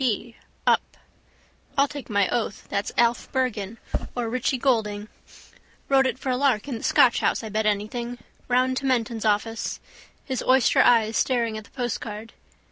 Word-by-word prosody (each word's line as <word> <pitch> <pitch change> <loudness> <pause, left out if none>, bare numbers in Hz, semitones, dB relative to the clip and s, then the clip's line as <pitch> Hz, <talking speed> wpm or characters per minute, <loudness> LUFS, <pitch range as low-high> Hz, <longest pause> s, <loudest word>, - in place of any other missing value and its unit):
p: 230 -1 -1 0.3
up. - - +2 0.8
I'll 280 +1 +5
take 285 -2 -8
my 200 -2 +2
oath 220 -4 -2
that's 200 - -2
Alf 235 0 +2
Bergan 230 -5 -1 0.4
or 240 -2 -2
Richie 255 +1 0
Goulding. 215 -5 0 0.8
Wrote 270 -1 +5
it 260 - -2
for 260 - -2
a 250 - +1
lark 265 -4 +1
in 245 -5 -4
the - - -11
Scotch 245 - +4
house - - 0
I 220 - -5
bet 215 +1 0
anything. 235 +4 -2 0.3
Round 255 +1 +2
to 270 - -2
Menton's 230 -3 0
office. 220 +2 0 0.5
His 260 -2 -2
oyster 260 -1 +4
eyes 225 -2 +4
staring 235 -4 +1
at 215 -1 -7
the - - -19
postcard. 225 -3 -5
235 Hz, 165 wpm, -25 LUFS, 215-255 Hz, 0.8 s, I'll